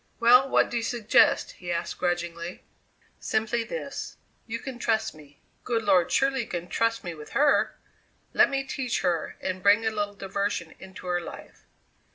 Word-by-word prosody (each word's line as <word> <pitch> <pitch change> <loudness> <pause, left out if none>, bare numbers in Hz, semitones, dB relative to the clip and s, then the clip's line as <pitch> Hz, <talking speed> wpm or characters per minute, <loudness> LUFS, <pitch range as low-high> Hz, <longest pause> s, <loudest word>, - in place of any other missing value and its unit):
"Well, 250 +3 +6
what - - +3
do 240 - -1
you - - 0
suggest?" 230 -2 +3
he 175 -1 -5
asked 170 - -3
grudgingly. 175 -1 -3 0.6
"Simply 225 +2 0
this: 485 - -6 0.3
You 230 0 -3
can 250 0 -7
trust 220 -1 0
me. 145 -2 -17 0.2
Good 230 -2 -1
Lord 185 -4 +4
you - - +1
surely 270 -3 +1
can 175 0 -5
trust 230 0 0
me 175 -3 -4
with 150 -2 -11
her! 290 0 +3 0.6
Let - - +5
me 270 0 -1
teach 260 -3 -2
her 175 -4 -1
and 185 0 -3
bring 205 +3 +5
a 220 - +2
little 205 -1 -2
diversion 195 -4 -3
into 190 -1 -11
her 175 -1 0
life. - - -11
205 Hz, 175 wpm, -27 LUFS, 175-235 Hz, 0.6 s, Well